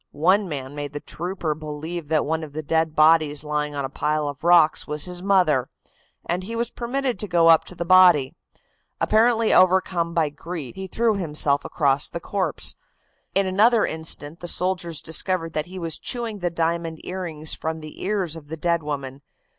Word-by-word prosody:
One 185 +6 +2
man 135 -2 -5
made 145 -1 -6
the 145 - -4
trooper 175 0 -4
believe 155 +2 -6
that 155 -2 +2
one 160 +1 -1
of 150 -2 -9
the 155 +1 -5
dead 160 +1 0
bodies 155 -2 +4
lying 150 -1 -2
on 140 -1 -2
a - - -2
pile 150 +2 -1
of 145 0 -7
rocks 170 -3 +4
was 150 0 -1
his 180 -1 -6
mother, 180 -10 +2 0.6
and 175 +2 -1
he 220 +5 -6
was 235 0 -2
permitted 250 +1 -2
to 210 - -3
go 170 -2 +4
up 165 -1 +6
to 180 - -11
the 170 - -4
body. 175 -7 +6 0.7
Apparently 225 0 +3
overcome 180 -2 +3
by 160 -3 +2
grief, 150 -1 -7
he 190 0 -7
threw 220 +2 +1
himself 150 -5 +1
across 140 -2 +1
the 170 - -5
corpse. 185 -3 -1 0.6
In 195 0 +3
another 215 +5 +3
instant 160 0 -3
the 175 - -7
soldiers 175 -3 0
discovered 165 0 -1
that 155 +1 -2
he 185 +1 -9
was 165 -3 -4
chewing 235 -4 -2
the 175 -1 -1
diamond 165 -1 -2
earrings 165 -4 -3
from 160 0 -4
the 155 -1 -10
ears 190 -5 -1
of 155 -3 -11
the 160 +2 -6
dead 170 +1 0
woman. 140 -2 -5
165 Hz, 185 wpm, -23 LUFS, 150-185 Hz, 0.7 s, up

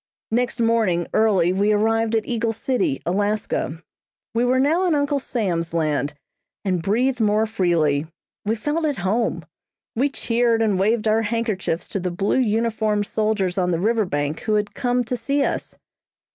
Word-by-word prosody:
Next 245 +2 0
morning 225 -7 +2
early 190 -5 +3
we 200 +3 +2
arrived 225 +2 +2
at 220 - 0
Eagle 230 -1 -1
City, 265 - -1
Alaska. 195 -4 -1 0.5
We 230 +1 +1
were 255 +1 +2
now 325 +7 +2
in 330 - +2
Uncle 285 0 +1
Sam's 175 -10 -2
land, 150 -2 0 0.5
and 185 -3 0
breathed 245 +7 +1
more 215 +1 +3
freely. 170 -8 +1 0.4
We 215 +2 0
felt 300 +8 -1
at 290 -3 -1
home. 225 +4 0 0.5
We 265 +5 +2
cheered 235 -3 +1
and 205 -4 +1
waved 215 +3 +1
our 220 +1 +3
handkerchiefs 215 -6 -2
to 195 - -2
the 180 0 -2
blue 195 +8 0
uniformed 220 -2 +1
soldiers 205 -4 0
on 180 -1 +1
the 170 -2 0
river 220 +2 +2
bank 145 -2 -2
who 215 -1 0
had 210 -1 -1
come 245 -1 0
to 245 +2 -3
see 275 +4 0
us. - - -3
220 Hz, 165 wpm, -22 LUFS, 190-235 Hz, 0.5 s, early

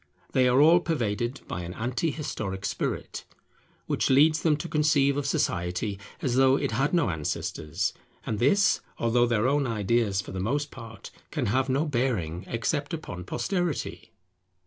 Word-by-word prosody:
They 130 -1 +3
are 125 +2 +4
all 165 +4 +7
pervaded 120 -6 -2
by 90 - -4
an 85 +1 -7
anti 125 +8 -1
historic 100 -10 -4
spirit, - - -3 0.6
which - - 0
leads 155 +4 +5
them 155 -3 +3
to 155 - -5
conceive 150 -3 +3
of 145 -1 -1
Society 95 -1 -1 0.2
as 130 -3 +1
though 135 0 +5
it 140 -2 -1
had 135 +6 +1
no 170 - +2
ancestors; 80 +3 -2 0.3
and 110 -2 -2
this, 200 - +3 0.2
although 120 +1 +2
their 115 0 +2
own 140 0 +2
ideas 110 -2 +1
for - - -5
the 95 - -4
most 140 +9 -1
part 115 -4 -10 0.2
can - - -2
have 130 +6 +1
no 135 +4 +1
bearing 115 - -1
except 145 +7 -1
upon 90 - -7
posterity. 160 - -2
125 Hz, 160 wpm, -27 LUFS, 100-145 Hz, 0.6 s, all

